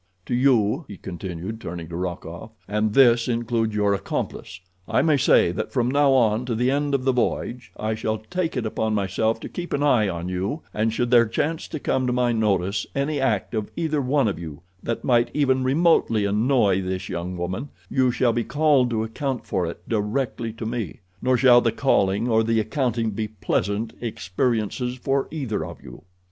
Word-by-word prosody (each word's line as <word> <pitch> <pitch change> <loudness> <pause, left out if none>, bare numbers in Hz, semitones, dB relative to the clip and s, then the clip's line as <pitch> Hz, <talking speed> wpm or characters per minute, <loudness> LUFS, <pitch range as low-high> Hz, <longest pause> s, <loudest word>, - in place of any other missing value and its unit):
To - - -3
you," 125 +1 +3
he 100 - -9
continued, 95 +4 -6
turning 85 -1 -6
to 85 - -6
Rokoff, 90 +2 -5 0.2
"and 105 +1 0
this 120 -3 +5
includes 115 -2 -1
your 105 -1 +2
accomplice, 100 0 -4 0.3
I - - +2
may 155 -1 +4
say 135 -10 +4
that 90 - -4
from 125 -1 +1
now 140 -1 +4
on 115 -3 +3
to 120 - -1
the 125 +3 +1
end 145 0 +1
of 130 - -1
the 135 - +4
voyage 125 0 -2
I 110 +1 -1
shall 110 0 -2
take 165 +8 -3
it 120 - -1
upon 110 0 -1
myself 105 +3 0
to - - -5
keep 175 -1 -6
an 145 - 0
eye 120 -8 +3
on 85 -1 -4
you, 95 - -2
and 110 +1 +1
should 120 +2 -1
there 120 -2 +6
chance 155 +8 -2
to 155 - -5
come 130 -2 0
to 125 - +1
my 125 -1 +2
notice 100 -3 0
any 140 +2 0
act 120 -7 0
of 110 -2 -2
either 155 -3 0
one 135 -1 +2
of 95 -5 -2
you 80 -4 -8 0.2
that 115 - -3
might 120 -2 +3
even 130 -3 +2
remotely 130 -6 +3
annoy 105 -2 +2
this 95 0 -3
young 90 +1 -4
woman 90 +11 -4 0.2
you 130 -1 +2
shall 120 0 +2
be 120 - 0
called 145 -4 +3
to 110 -2 -1
account 125 +3 -3
for 90 -2 -1
it 85 - -8
directly 115 +2 -1
to 115 0 -7
me, 115 +1 -4 0.2
nor 130 0 +2
shall 120 0 +6
the 115 - +1
calling 105 -4 +1
or 110 -2 +3
the 115 0 +1
accounting 115 -2 -1
be 110 +1 -3
pleasant 105 +1 -2
experiences 115 +3 -1
for 135 +2 -1
either 130 - -3
of 85 +2 -8
you. 65 -3 -11
115 Hz, 195 wpm, -24 LUFS, 105-130 Hz, 0.3 s, there